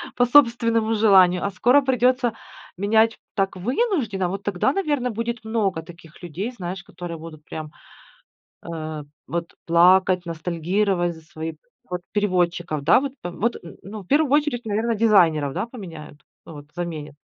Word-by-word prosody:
по 245 - +3
собственному 230 -4 +3
желанию, 190 -4 +5
а 200 - -1
скоро 245 +9 +4
придется 250 -2 +2 0.4
менять 220 +3 +2 0.2
так, 195 -2 0
вынужденно. 235 - -1
Вот 195 +2 -4
тогда, 205 +7 0
наверно, 290 -9 -1
будет 230 +1 -4
много 200 -7 -1
таких 170 0 -15
людей, 180 +8 -4
знаешь, 185 -4 -6
которые 175 -2 -8
буду 160 -1 -9
прям, 155 0 -8 0.9
э, 155 -2 -6 0.2
вот 170 0 -4
плакать, 180 +1 +4
ностальгировать 175 +2 -1
за 160 - -14
свои 160 0 -7 0.4
Вот, 180 0 -3
переводчиков, 175 -6 0
да, 155 - +5
вот. 275 -1 -4
Вот 205 +7 -2
н 165 - -11
ну, 210 +2 -8
в - - -20
первую 290 +5 +2
очередь, 290 -5 +1
наверно, 220 +2 0
дизайнеров, 170 -10 +3
да, - - -2
поменяют, 165 - -10 0.3
ну - - -10
вот, 145 -1 -11
заменят. 155 -4 -5
190 Hz, 150 wpm, -23 LUFS, 170-230 Hz, 0.9 s, желанию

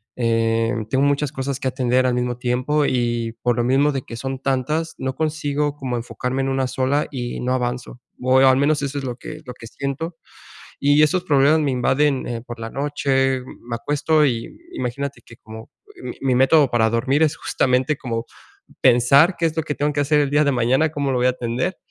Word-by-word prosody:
eh, 115 -1 +1 0.2
tengo 135 +1 +2
muchas 145 0 +1
cosas 135 -2 -4
que 130 - -2
atender 130 0 +1
al 125 - +2
mismo 125 0 -1
tiempo 125 +4 0
y, 120 -2 0
por 120 -1 +1
lo 120 - +1
mismo 135 +4 +3
de 135 -3 -3
que 115 - -9
son 135 +3 -4
tantas, 150 +5 -1
no 130 0 -3
consigo 150 -2 -1
como 130 -4 -4
enfocarme 125 +2 -3
en 135 - -1
una 135 -1 0
sola 130 +3 0
y 120 -3 -5
no 125 +1 -2
avanzo, 125 0 -4 0.2
o 130 +1 +3
al 130 -1 +6
menos 145 +1 +1
eso 140 +1 -3
es 140 - -7
lo 125 -2 -4
que 155 +5 -9
lo 125 -3 -8
que 115 - -12
siento. 140 +7 -5 0.6
Y 145 +2 +4
esos 175 +4 +1
problemas 150 0 +4
me 145 - 0
invaden, 135 +2 +1
eh, 115 -1 -4
por 120 -1 -8
la 115 0 -5
noche, 135 -2 0
me 120 -2 -8
acuesto 150 +5 +1
y 115 -4 -3
imagínate 140 - -4
que 115 - -15
como 110 0 -12 0.3
mi - - -6
mi 130 -2 +1
método 135 +3 +4
para 115 -2 +2
dormir 130 +6 +1
es 160 0 +2
justamente 130 0 0
como 115 -3 -4 0.6
pensar 140 +9 +5
qué 165 - +2
es 160 - -6
lo 160 - +1
que 150 - -3
tengo 145 +1 -1
que 145 - 0
hacer 150 +1 +2
el 145 -1 +1
día 145 +2 +3
de 145 - +2
mañana, 130 +5 +2
cómo 140 -2 -1
lo 130 - 0
voy 125 - +1
a - - +5
atender, 125 +7 -2
135 Hz, 210 wpm, -21 LUFS, 125-145 Hz, 0.6 s, al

